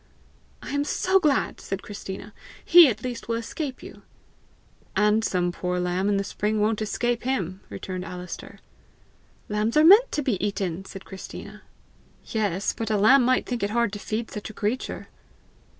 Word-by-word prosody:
"I - - -6
am 285 0 +1
so 375 +5 +2
glad!" 300 -6 +1
said 195 0 -5
Christina. 200 0 -8 0.3
"He 345 -2 +9
at 220 -3 -2
least 245 -2 -5
will 230 - 0
escape 255 +4 -5
you!" - - -11 0.9
"And 210 +1 +3
some 180 -4 0
poor 180 +1 -2
lamb 180 +2 0
in 200 - +2
the 195 - 0
spring 210 +2 -1
won't 215 +1 +1
escape 240 +2 -1
him!" 195 -8 -2
returned 185 -1 -5
Alister. 180 -1 -8 0.9
"Lambs 215 +4 0
are 305 - +6
meant 420 +8 +8
to 295 - 0
be 205 -9 -1
eaten!" 195 -3 -2
said 190 0 -10
Christina. 190 -1 -9 0.6
"Yes; 205 -4 -1
but 225 -1 -4
a 215 - +2
lamb 250 +6 +6
might 255 +1 +2
think 245 -2 -3
it 200 - 0
hard 235 -1 +1
to 205 - -5
feed 220 +2 -4
such 210 0 -6
a - - -9
creature!" 220 +5 -3
215 Hz, 170 wpm, -25 LUFS, 195-245 Hz, 0.9 s, He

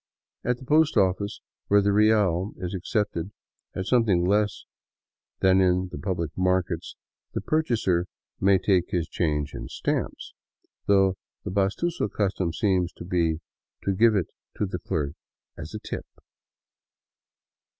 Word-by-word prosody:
At 125 0 0
the 130 - -12
post 155 0 +3
office, 100 +1 +1 0.3
where 100 - +5
iht 100 0 +2
real 105 -3 +3
is 90 0 -4
accepted 95 -1 -1 0.5
at 95 - -2
something 105 -8 +3
less 105 +1 +1 0.8
than 95 0 +5
in 90 0 +2
the - - -6
public 85 -5 -3
markets, 90 -2 0 0.4
the - - -1
purchaser 110 - +1 0.3
may 95 0 +5
take 95 -2 +2
his 85 -2 -1
change 75 -4 -1
in - - -6
stamps, - - -3 0.5
though 95 -2 +4 0.3
the - - -4
pastuso 100 - 0
custom 95 -4 0
seems 90 -1 +1
to - - -9
be 85 -3 0 0.4
to 100 - +1
give 110 +3 +4
it 95 -5 0 0.3
to - - +1
the 90 -2 -4
clerk 75 -5 -2 0.4
as 80 +7 -8
a - - -4
" - - -42
tip." - - -5
95 Hz, 140 wpm, -26 LUFS, 90-105 Hz, 0.8 s, where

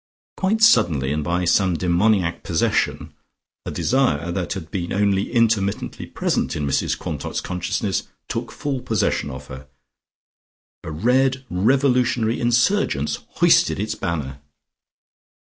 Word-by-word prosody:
Quite 215 +4 0
suddenly 75 - +4
and 75 0 -2
by 90 +3 -1
some 90 +1 +3
demoniac 90 +1 +1
possession, 80 -2 -1 0.5
a - - -1
desire 120 - 0
that 90 0 -2
had 80 -6 -8
been 85 -3 -3
only 100 -1 +1
intermittently 110 -5 0
present - - -1
in 75 - -2
Mrs 70 - 0
Quantock's - - -4
consciousness 95 +2 -2 0.2
took - - -4
full 140 -3 -3
possession 75 - 0
of 65 -1 -8
her, 65 0 -10 1.2
a - - -6
red 130 - +1
revolutionary 125 +2 +2
insurgence 120 - +1 0.2
hoisted - - +4
its 105 +1 -2
banner. 75 -8 -4
95 Hz, 120 wpm, -22 LUFS, 85-120 Hz, 1.2 s, suddenly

